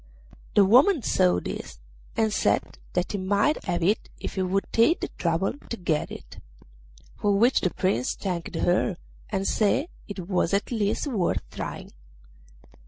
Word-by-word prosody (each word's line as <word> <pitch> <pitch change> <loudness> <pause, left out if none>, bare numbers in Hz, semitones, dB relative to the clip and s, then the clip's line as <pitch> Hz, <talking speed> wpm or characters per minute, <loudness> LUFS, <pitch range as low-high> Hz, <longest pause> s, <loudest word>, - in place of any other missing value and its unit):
The 205 - +7
woman 260 - +5
saw 90 - +3
this, - - -6 0.4
and 220 -1 +2
said - - 0
that 180 0 0
he 205 - -2
might 205 +10 +1
have 175 -3 -1
it 205 +6 +1
if - - -5
he 190 - -1
would 190 +2 0
take 230 +10 +4
the - - -3
trouble 170 +2 -1 0.2
to 235 - -3
get 165 -5 -1
it; - - -10 0.8
for 205 -1 +2
which 240 +6 +4
the 185 - +2
Prince 175 -9 0
thanked 180 -3 -4
her, 180 +1 +1 0.3
and 195 -1 -1
said 230 - +1 0.2
it 190 -4 -6
was 185 -1 +1
at 200 - -2
least 210 +1 0
worth 180 - -1
trying. - - -6
195 Hz, 160 wpm, -26 LUFS, 180-220 Hz, 0.8 s, The